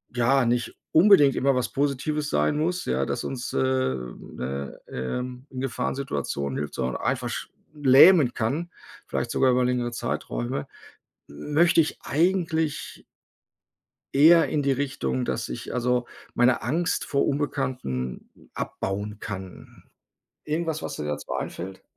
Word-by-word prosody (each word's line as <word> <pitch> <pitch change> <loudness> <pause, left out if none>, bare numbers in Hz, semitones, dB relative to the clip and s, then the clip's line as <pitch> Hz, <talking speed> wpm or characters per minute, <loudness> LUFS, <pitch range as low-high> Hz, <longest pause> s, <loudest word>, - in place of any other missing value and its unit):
ja, 125 +3 +3
nicht 120 +1 0 0.2
unbedingt 160 -6 +6
immer 135 0 +2
was 125 -1 0
Positives 145 +2 -1
sein 150 - +2
muss, 175 +4 -1
ja, 65 +2 0
dass - - -3
uns, 130 -2 -4
äh, - - -1
ne, 70 - -3
ähm, 125 - -4
in 130 -1 -5
Gefahrensituationen 120 - -2
hilft, 75 0 -4
sondern 65 0 -2
einfach - - -2 0.3
lähmen 145 0 +7
kann, 150 +10 -2 0.4
vielleicht - - -2
sogar 130 - +3
über 125 0 +3
längere 125 -1 0
Zeiträume, - - -3 0.6
möchte 150 - +3
ich 155 - -3
eigentlich 160 -1 0 1.1
eher 165 +4 +6
in 150 - 0
die 140 -1 +2
Richtung, 70 - -2
dass - - -2
ich - - -6
also 125 0 +1 0.3
meine 125 0 +3
Angst 165 - 0
vor 140 - +1
Unbekannten 125 - -2 0.2
abbauen 100 +2 -4
kann. 95 -3 -8 0.6
Irgendwas, 160 0 -2
was - - -5
dir 75 - -4
dazu 75 0 -4
einfällt? 95 +2 -5
130 Hz, 130 wpm, -25 LUFS, 95-150 Hz, 1.1 s, lähmen